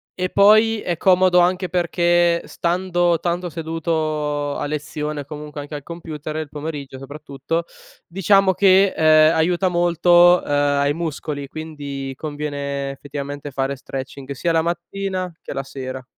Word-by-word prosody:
e 185 0 -2
poi 215 +2 +5
è 175 -2 -2
comodo 185 0 +4
anche 180 +1 +2
perché 175 -1 +2
stando 175 -1 0
tanto 175 0 -2
seduto 155 -3 -2
a - - -3
lezione, 150 0 -4
comunque 150 0 -8
anche 145 +1 -8
al 145 - -7
computer 155 -2 -7
il 155 -2 -4
pomeriggio, 145 -3 -6
soprattutto, 145 +3 -5 0.4
diciamo, 195 +1 +3
che, 195 0 +5
uhm, 160 - -1 0.3
aiuta 175 +3 +2
molto, 175 0 +5
uhm, - - -9
ai 145 0 +2
muscoli; 150 -3 -4
quindi 145 -3 -6
conviene, 145 -2 -4
effettivamente, 145 +1 -7
fare 135 +1 -2
stretching 135 +1 -7
sia 165 +5 -1
la 165 -1 +2
mattina 185 +2 -3
che - - -6
la 135 - -2
sera. 130 -1 -7
160 Hz, 135 wpm, -21 LUFS, 145-175 Hz, 0.4 s, poi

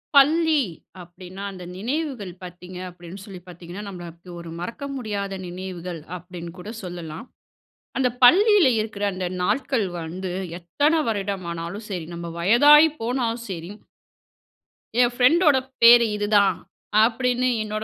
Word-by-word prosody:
பள்ளி 310 +1 +5 0.4
அப்படின்னா, 180 +2 -10
அந்த 185 -2 -10
நினைவுகள் 245 - -3
பார்த்தீங்க 180 0 -10
அப்படின்னு 175 +2 -11
சொல்லி 190 -3 -9
பார்த்தீங்கன்னா, 175 +3 -9
நம்மளுக்கு 175 -2 -10
ஒரு 170 - -9
மறக்க 230 +10 -6
முடியாத 205 -6 -4
நினைவுகள் 180 -2 -6 0.2
அப்படின்னு 175 -1 -9
கூட 205 +4 -7
சொல்லலாம். 175 0 -7 0.7
அந்த 260 -2 +2
பள்ளியில 395 - +7
இருக்கிற 215 -1 -4
அந்த 185 0 -4 0.2
நாள்கள் 255 0 0
வந்து, 180 +3 -5 0.3
எத்தன 290 - +1
வருடம் 200 -3 -3
ஆனாலும் 170 +6 -6
சரி, 180 -5 -4
நம்ம 170 0 -6
வயதாகி 290 - +7
போனாலும் 235 0 -2
சரி, 170 -2 -6 1.3
என் 245 -1 +4
பிரண்டோட 295 +3 +5 0.2
பேரு 235 0 +9
இதுதான், 205 -1 +3 0.5
அப்படின்னு. 250 +2 +1
என்னோட 215 0 -4
200 Hz, 120 wpm, -23 LUFS, 180-245 Hz, 1.3 s, பேரு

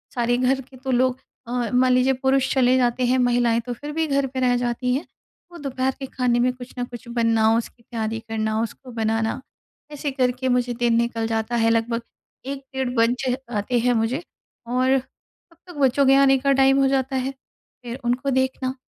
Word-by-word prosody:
सारे 240 0 +1
घर 265 +1 +1
के 260 +1 -16
तो 260 +1 -4
लोग 255 +1 +2 0.3
अ, - - -7 0.2
मान 255 +1 +4
लीजिए 255 +1 +3
पुरुष 265 0 +2
चले 255 -1 +4
जाते 245 0 +1
हैं, 255 +1 +2
महिलाएँ 240 -2 +2
तो 245 - -3
फिर 290 +5 -7
भी 320 0 0
घर 280 -1 +1
पे 260 0 -5
रह 250 -1 +3
जाती 245 +1 -1
हैं। 285 - -3 0.4
तो 345 - -11
दोपहर 265 -1 -1
के 270 - -4
खाने 250 -2 0
में 250 +1 +3
कुछ 250 0 -11
न - - 0
कुछ 240 0 -11
बनाओ, 230 -1 +3
उसकी 235 +1 -6
तैयारी 225 -1 -3
करना 220 0 -1
उसको 245 +3 -6
बनाना। 225 +1 -1 0.5
ऐसे 290 -1 -3
करके 255 -1 0
मुझे 245 -1 +1
दिन 235 -1 +2
निकल 230 -1 0
जाता 225 +1 -1
है, 225 -1 +3
लगभग 230 +1 0 0.4
1 275 0 -5
डेढ़ 265 -1 -1
बज 230 0 +3 0.4
जाते 235 +2 0
हैं 245 +1 +2
मुझे 230 +6 0 0.5
और 255 +2 +2
तब 315 +5 -13
तक 355 - -10
बच्चों 275 +1 +3
के 270 - +6
आने 275 -1 +5
का 275 +1 +1
टाइम 270 0 +4
हो 270 - +4
जाता 265 0 0
है। 260 +1 -1
फ़िर 250 -1 -12
उनको 255 +3 0
देखना, 260 0 0
250 Hz, 200 wpm, -23 LUFS, 235-265 Hz, 0.5 s, के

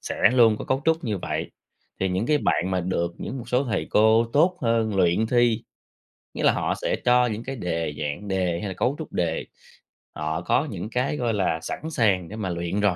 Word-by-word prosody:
sẽ - - -5 0.2
luôn 115 -4 +5
có - - -5
cấu 130 +1 0
trúc 160 -2 +1
như 105 -4 -1
vậy, - - -3 0.5
thì 95 - +1
những 95 +5 -1
cái 150 -1 +3
bạn 95 -8 0
mà 95 - +1
được 85 -1 -1
những 135 - -5
một 120 - -9
số 125 +3 +2
thầy 115 - -2
cô 110 +2 +5
tốt 175 +5 +3
hơn 115 -3 +1
luyện 90 +4 +3
thi, 120 -1 +2 0.7
nghĩa - - -4
là - - +6
họ - - -1
sẽ - - 0
cho 125 0 +5
những 110 -1 -3
cái 135 +2 -5
đề, 85 - -2
dạng 75 +7 -4
đề 90 -3 0
hay 105 - -4
là 95 - -4
cấu 130 +9 0
trúc 160 - -7
đề, 85 -2 -1 0.7
họ 80 +2 -2
có 130 - +1
những 100 +2 -5
cái, 125 +5 -1
gọi 120 -2 0
là, 90 -5 0
sẵn 155 - -5
sàng 100 - +1
để 105 - -7
mà 105 -4 -3
luyện 85 +3 -2
rồi. 100 -4 +2
105 Hz, 225 wpm, -24 LUFS, 90-125 Hz, 0.7 s, là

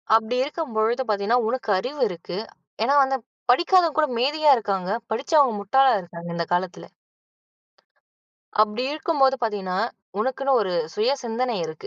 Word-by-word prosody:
அப்டி 225 +2 +1
இருக்கும் 300 -2 -5
பொழுது 225 +4 +1
பார்த்தீங்கன்னா, 210 +4 +1
உனக்கு 250 -1 -3
அறிவு 265 +7 -5
இருக்கு. 175 0 -7 0.5
ஏன்னா 270 +5 +2
வந்து 270 0 0 0.3
படிக்காதவங்க 345 +4 +4
கூட 310 -1 +3
மேதையா 295 +4 +3
இருக்காங்க, 195 -4 -2 0.2
படிச்சவங்க 270 +2 +2
முட்டாளா 265 +7 +3
இருக்காங்க, 170 -1 -10
இந்த 170 0 -2
காலத்துல. 180 0 -2 1.8
அப்டி 215 +3 -1
இருக்கும்போது 295 -4 +2
பார்த்தீங்கன்னா, 195 -5 -2 0.4
உனக்குன்னு 265 +3 0
ஒரு 185 -3 -3 0.2
சுய 225 +5 +1
சிந்தனை 240 +1 -2
இருக்கு. 155 0 -9
235 Hz, 130 wpm, -23 LUFS, 200-270 Hz, 1.8 s, படிக்காதவங்க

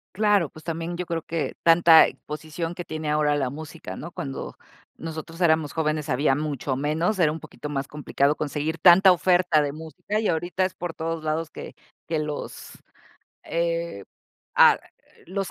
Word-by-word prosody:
Claro, 205 -5 +3
pues, 155 - -14
también 165 +1 -4
yo 180 - -3
creo 165 -1 -3
que 165 0 -3
tanta 165 -1 +7
exposición 155 +3 -6
que 175 0 -7
tiene 155 -2 -4
ahora 150 -1 +2
la 135 -3 0
música, 155 +3 -8
¿no? 170 - -8
Cuando 135 -4 -6 0.4
nosotros 165 +1 -7
éramos 160 -3 +2
jóvenes, 155 -1 -1
había 135 +1 +2
mucho 145 -2 -2
menos, 160 +8 0
era 160 -4 +4
un 160 - -5
poquito 150 - -9
más 140 -1 -3
complicado 145 -1 0
conseguir 155 +2 -3
tanta 190 +3 +8
oferta 175 -2 +3
de 145 -1 -2
música 160 +7 -4
y 220 - 0
ahorita 175 +3 0
es 185 - -3
por 175 -2 -5
todos 165 0 -4
lados 155 +1 -2
que - - -20 0.2
que - - -61 0.3
que 160 -1 -1
los, 150 -1 -5 0.7
eh, 170 - -2 0.5
ah, - - +7 0.5
los 195 +1 -3
160 Hz, 170 wpm, -25 LUFS, 150-170 Hz, 0.7 s, tanta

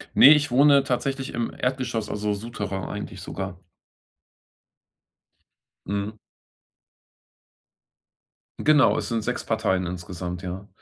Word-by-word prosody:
Ne, 140 - +9
ich 145 -3 0
wohne 140 +1 +6
tatsächlich 135 +1 -2
im 115 0 -2
Erdgeschoss, 125 -4 -2
also, 105 0 -1
Souterrain 100 -3 -5
eigentlich 105 -3 -6
sogar. 95 -1 -6 2.2
Mhm. 100 +2 -3 2.4
Genau, 150 -2 +4
es - - -4
sind 115 -2 -1
sechs - - -2
Parteien 95 -1 0
insgesamt, 90 0 -6
ja. 95 +3 -6
105 Hz, 100 wpm, -25 LUFS, 95-130 Hz, 2.4 s, Ne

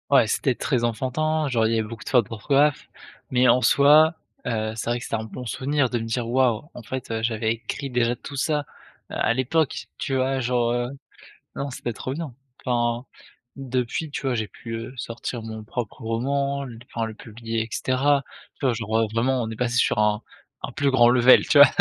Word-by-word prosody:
Ouais, - - +5
c'était - - +1
très 120 - 0
enfantin, 150 +7 0
genre 120 -4 +2
il - - +2
y 115 - +2
avait 110 - -2
beaucoup 115 -1 -8
de - - -6
fautes 120 -6 +3
d'orthographe, 140 +6 +1 0.4
mais 125 0 +3
en 125 +1 +5
soi, 150 +5 +6 0.3
heu, 110 -2 -1
c'est 115 - -3
vrai 120 +1 0
que - - -8
c'était - - -2
un 110 - -2
bon 125 +3 -8
souvenir 135 +2 0
de 120 - -1
me - - -4
dire: 115 +1 -2
«Waouh, 120 -3 +2
en 120 - -9
fait, 130 +2 -5
heu, 110 0 -1
j'avais 110 -1 +1
écrit 135 +4 -5
déjà 120 -1 +1
tout 145 - -9
ça 145 +2 0 0.4
à - - +1
l'époque» 135 +5 0
tu 135 - -2
vois? 130 0 +1
Genre, 120 -1 +1
heu, 120 0 0 0.7
non 140 - -3
c'était 120 -2 -4
trop 130 +4 -5
bien. 155 -3 -5 0.3
Enfin 120 -1 0 0.5
depuis, 130 +3 -2
tu - - -5
vois? 130 -2 0
J'ai 110 -2 -1
pu, 115 - -9
heu, 115 +2 -6
sortir 120 0 -5
mon 110 -1 -7
propre 115 +2 -5
roman, 140 +5 -1 0.3
enfin 115 -1 -1
le 110 - -6
publier 115 +1 -5
et 110 - -3
cetera, 140 +4 +2 0.4
tu - - -2
vois? 130 - +3
Genre, 110 -1 -1
heu, - - -5
vraiment 125 +3 +1
on 110 - -3
est 110 - -5
passé 120 +1 -1
sur 115 - +2
un 105 0 +2 0.4
un - - -4
plus 140 +1 +1
grand 120 -2 +6
level, 125 +1 +6
tu 145 - +5
vois? 145 - +11
120 Hz, 210 wpm, -24 LUFS, 115-135 Hz, 0.7 s, vois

